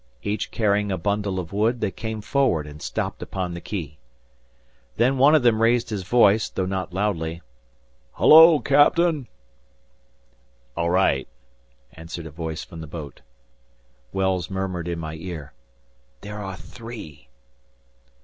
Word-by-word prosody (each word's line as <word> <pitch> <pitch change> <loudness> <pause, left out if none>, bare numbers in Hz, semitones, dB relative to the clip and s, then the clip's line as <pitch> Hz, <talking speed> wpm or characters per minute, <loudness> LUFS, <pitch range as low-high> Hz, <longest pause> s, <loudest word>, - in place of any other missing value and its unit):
Each 105 +1 -2
carrying 105 -2 +1
a 95 - -1
bundle 100 +1 -1
of 85 0 -7
wood, 110 +4 +1
they 105 -3 -1
came 110 0 -5
forward 115 - +1
and 75 0 -11
stopped - - -4
upon 90 -2 -4
the 85 - -7
quay. 80 -7 -6 1.0
Then 130 +3 +2
one 145 +4 +6
of 150 - +3
them 115 -2 +3
raised 120 +1 +2
his 105 -3 -2
voice, 105 +1 +3
though 95 - -2
not 95 0 -3
loudly. 85 -4 -2 0.7
"Hullo! 160 +1 +8
Captain!" 145 0 +3 1.5
"All 85 0 0
right," 85 -7 +2 0.7
answered 80 +1 -8
a 80 - -8
voice 80 0 -5
from 80 - -10
the 80 - -8
boat. 75 -4 -9 0.9
Wells 95 -3 0
murmured 95 -3 -3
in 85 -1 -2
my 80 -1 -5
ear, 80 -5 -7 0.7
"There 105 +1 -7
are 95 -1 -5
three!" 110 - -11
95 Hz, 140 wpm, -23 LUFS, 85-115 Hz, 1.5 s, Hullo